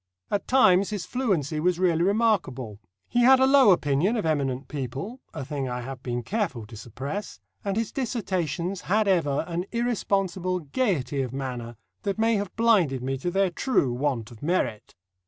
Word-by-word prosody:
At 205 Hz, -, -1 dB
times 195 Hz, -7 st, +5 dB
his 205 Hz, -5 st, -4 dB
fluency 175 Hz, -, -1 dB
was 175 Hz, +2 st, +1 dB
really 175 Hz, -3 st, +2 dB
remarkable. 185 Hz, -, +1 dB, 0.3 s
He 240 Hz, -, 0 dB
had 260 Hz, +2 st, +7 dB
a 265 Hz, -, +5 dB
low 270 Hz, -4 st, +6 dB
opinion 175 Hz, -, +3 dB
of 210 Hz, -, -2 dB
eminent 135 Hz, -4 st, -1 dB
people 140 Hz, -, -5 dB
a 145 Hz, -5 st, -6 dB
thing 140 Hz, -2 st, -3 dB
I 125 Hz, 0 st, -3 dB
have 130 Hz, 0 st, -7 dB
been 120 Hz, -2 st, -3 dB
careful 180 Hz, -, -2 dB
to 110 Hz, -, -12 dB
suppress, 135 Hz, -, -6 dB, 0.2 s
and 200 Hz, 0 st, -1 dB
his 225 Hz, -2 st, -1 dB
dissertations 185 Hz, -, -2 dB
had 215 Hz, +2 st, +3 dB
ever 160 Hz, -6 st, +2 dB
an 175 Hz, +1 st, -2 dB
irresponsible 195 Hz, -6 st, 0 dB
gaiety 145 Hz, -, -1 dB
of 130 Hz, -2 st, -4 dB
manner 125 Hz, -3 st, -5 dB, 0.3 s
that 200 Hz, 0 st, -2 dB
may 225 Hz, +1 st, +3 dB
have 200 Hz, -1 st, -4 dB
blinded 190 Hz, -, +3 dB
me 135 Hz, +1 st, -1 dB
to 175 Hz, -, -2 dB
their 195 Hz, 0 st, +1 dB
true 170 Hz, -, +1 dB
want 125 Hz, -4 st, -2 dB
of 115 Hz, -, -14 dB
merit. 150 Hz, -, -1 dB
175 Hz, 175 wpm, -26 LUFS, 135-205 Hz, 0.3 s, had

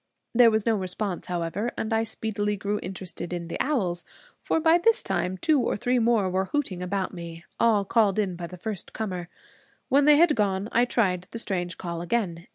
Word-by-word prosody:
There 240 Hz, -1 st, +7 dB
was 220 Hz, -1 st, +1 dB
no 230 Hz, -1 st, +3 dB
response, 190 Hz, 0 st, -3 dB
however, 180 Hz, +6 st, -2 dB
and 220 Hz, +1 st, -2 dB
I 225 Hz, 0 st, +2 dB
speedily 210 Hz, -2 st, -2 dB
grew 205 Hz, +1 st, -2 dB
interested 185 Hz, -1 st, -5 dB
in 170 Hz, -1 st, -4 dB
the -, -, -4 dB
owls; 190 Hz, -12 st, 0 dB, 0.4 s
for -, -, 0 dB
by 325 Hz, +2 st, +5 dB
this 455 Hz, +6 st, +3 dB
time 185 Hz, +1 st, -1 dB
two 300 Hz, -, +3 dB
or 230 Hz, -, 0 dB
three 245 Hz, +4 st, +1 dB
more 225 Hz, -4 st, +3 dB
were 185 Hz, +1 st, 0 dB
hooting 195 Hz, -7 st, -2 dB
about 185 Hz, +1 st, -2 dB
me, 170 Hz, -1 st, -8 dB
all 215 Hz, -4 st, +3 dB
called 210 Hz, -1 st, +2 dB
in 195 Hz, -4 st, 0 dB
by 170 Hz, 0 st, -6 dB
the 180 Hz, -, -10 dB
first 205 Hz, +1 st, -6 dB
comer. 185 Hz, -5 st, -4 dB, 0.6 s
When 280 Hz, +2 st, +4 dB
they 300 Hz, -1 st, +7 dB
had 330 Hz, -1 st, +5 dB
gone 200 Hz, -1 st, 0 dB
I 240 Hz, +1 st, +4 dB
tried 185 Hz, -7 st, 0 dB
the -, -, -6 dB
strange 180 Hz, -5 st, -3 dB
call 170 Hz, -2 st, -5 dB
again. 175 Hz, -3 st, -2 dB
200 Hz, 200 wpm, -26 LUFS, 180-230 Hz, 0.6 s, There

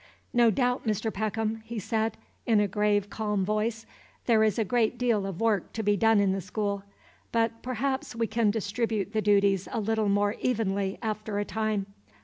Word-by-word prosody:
"No 240 Hz, -2 st, +5 dB
doubt, 250 Hz, +3 st, +1 dB
Mr. 215 Hz, 0 st, -1 dB
Peckham," 220 Hz, +1 st, -2 dB
he 230 Hz, +1 st, -7 dB
said, 220 Hz, +2 st, -1 dB, 0.3 s
in 225 Hz, -3 st, +4 dB
a 205 Hz, -, +3 dB
grave, 205 Hz, 0 st, +1 dB
calm 210 Hz, -3 st, -1 dB
voice, 215 Hz, +2 st, -1 dB, 0.4 s
"there 225 Hz, -3 st, +4 dB
is 215 Hz, -3 st, +2 dB
a 225 Hz, -, +1 dB
great 235 Hz, +2 st, +1 dB
deal 230 Hz, -5 st, +1 dB
of 190 Hz, -3 st, -6 dB
work 220 Hz, -5 st, +1 dB
to 220 Hz, -, -3 dB
be 205 Hz, 0 st, +3 dB
done 225 Hz, +1 st, +4 dB
in 200 Hz, -1 st, +3 dB
the 195 Hz, 0 st, -1 dB
school; 200 Hz, +1 st, -2 dB, 0.5 s
but 230 Hz, 0 st, 0 dB
perhaps 260 Hz, +1 st, -2 dB
we 230 Hz, 0 st, +1 dB
can 225 Hz, -1 st, +1 dB
distribute 215 Hz, -1 st, -1 dB
the 215 Hz, -, +1 dB
duties 200 Hz, -2 st, +3 dB
a -, -, -1 dB
little 220 Hz, 0 st, 0 dB
more 205 Hz, +1 st, +2 dB
evenly 200 Hz, -5 st, 0 dB
after 215 Hz, -1 st, -3 dB
a 205 Hz, -, 0 dB
time. 215 Hz, -2 st, -1 dB
215 Hz, 185 wpm, -28 LUFS, 205-225 Hz, 0.5 s, No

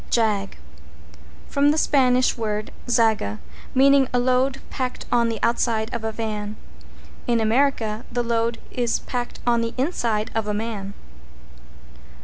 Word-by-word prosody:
=JAG= 210 Hz, -4 st, +1 dB, 0.9 s
From 285 Hz, +1 st, +3 dB
the 300 Hz, -, +2 dB
Spanish 255 Hz, -4 st, +3 dB
word 215 Hz, -2 st, -3 dB, 0.2 s
zaga, 220 Hz, -, +2 dB, 0.4 s
meaning 275 Hz, 0 st, +5 dB
a 250 Hz, -, +1 dB
load 255 Hz, +2 st, +2 dB
packed 255 Hz, -2 st, -3 dB
on 235 Hz, -1 st, +3 dB
the 225 Hz, -, -2 dB
outside 230 Hz, -1 st, +1 dB
of 235 Hz, -2 st, -3 dB
a 220 Hz, -, -1 dB
van. 215 Hz, -1 st, -4 dB, 0.7 s
In 235 Hz, -1 st, +2 dB
America 225 Hz, -1 st, +1 dB
the 240 Hz, +1 st, 0 dB
load 230 Hz, 0 st, 0 dB
is 240 Hz, -2 st, 0 dB
packed 245 Hz, -1 st, -4 dB
on 235 Hz, -1 st, +3 dB
the 230 Hz, 0 st, -3 dB
inside 235 Hz, -6 st, 0 dB
of 225 Hz, -1 st, -1 dB
a 210 Hz, -, -1 dB
man. 205 Hz, -2 st, -4 dB
230 Hz, 135 wpm, -23 LUFS, 220-250 Hz, 0.9 s, meaning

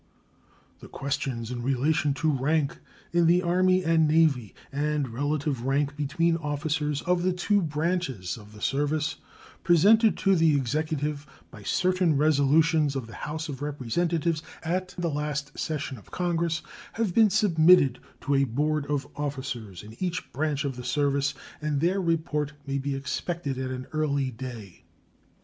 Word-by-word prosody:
The -, -, -11 dB
questions 130 Hz, -4 st, -3 dB
in 120 Hz, -1 st, -4 dB
relation 140 Hz, +3 st, +1 dB
to 155 Hz, +1 st, +1 dB
rank 140 Hz, +1 st, 0 dB, 0.3 s
in 175 Hz, -1 st, +4 dB
the 175 Hz, +2 st, +4 dB
Army 185 Hz, +1 st, +3 dB
and 160 Hz, -1 st, +4 dB
Navy 150 Hz, -, +2 dB, 0.2 s
and 145 Hz, 0 st, 0 dB
relative 145 Hz, +2 st, -2 dB
rank 140 Hz, +1 st, +1 dB
between 165 Hz, +3 st, +1 dB
officers 150 Hz, -1 st, -2 dB
of 180 Hz, 0 st, +1 dB
the 185 Hz, +1 st, +2 dB
two 200 Hz, +3 st, +1 dB
branches 150 Hz, -, -2 dB
of 105 Hz, -3 st, -13 dB
the 105 Hz, -, -13 dB
service, 145 Hz, +2 st, 0 dB, 0.5 s
presented 205 Hz, +6 st, +5 dB
to 195 Hz, -1 st, +3 dB
the 160 Hz, -3 st, +4 dB
Executive 150 Hz, +2 st, -1 dB, 0.2 s
by 110 Hz, -, -12 dB
certain 180 Hz, -, +2 dB
resolutions 150 Hz, 0 st, +3 dB
of 130 Hz, -3 st, -3 dB
the 115 Hz, -, -12 dB
House 155 Hz, +1 st, -5 dB
of 140 Hz, -3 st, -6 dB
Representatives 155 Hz, +4 st, -1 dB, 0.2 s
at 185 Hz, +3 st, -2 dB
the 175 Hz, -1 st, -1 dB
last 150 Hz, -1 st, -3 dB
session 150 Hz, -5 st, -3 dB
of -, -, -19 dB
Congress, 170 Hz, -2 st, -1 dB, 0.3 s
have 220 Hz, -5 st, -1 dB
been 220 Hz, +1 st, +6 dB
submitted 170 Hz, -, +5 dB, 0.2 s
to 145 Hz, -, 0 dB
a 140 Hz, 0 st, +4 dB
board 145 Hz, +4 st, -1 dB
of 145 Hz, -1 st, -1 dB
officers 130 Hz, -, -5 dB
in 110 Hz, +2 st, -11 dB
each 180 Hz, -1 st, -3 dB
branch 150 Hz, +1 st, -1 dB
of 135 Hz, -3 st, -3 dB
the 125 Hz, -, -6 dB
service, 140 Hz, 0 st, 0 dB, 0.3 s
and 150 Hz, -2 st, 0 dB
their 180 Hz, +5 st, +1 dB
report 155 Hz, -4 st, -1 dB
may 140 Hz, -1 st, -2 dB
be 140 Hz, 0 st, -2 dB
expected 140 Hz, +1 st, -3 dB
at 130 Hz, 0 st, -3 dB
an 130 Hz, 0 st, -5 dB
early 140 Hz, -4 st, 0 dB
day. 115 Hz, -6 st, -9 dB
150 Hz, 155 wpm, -27 LUFS, 135-165 Hz, 0.5 s, been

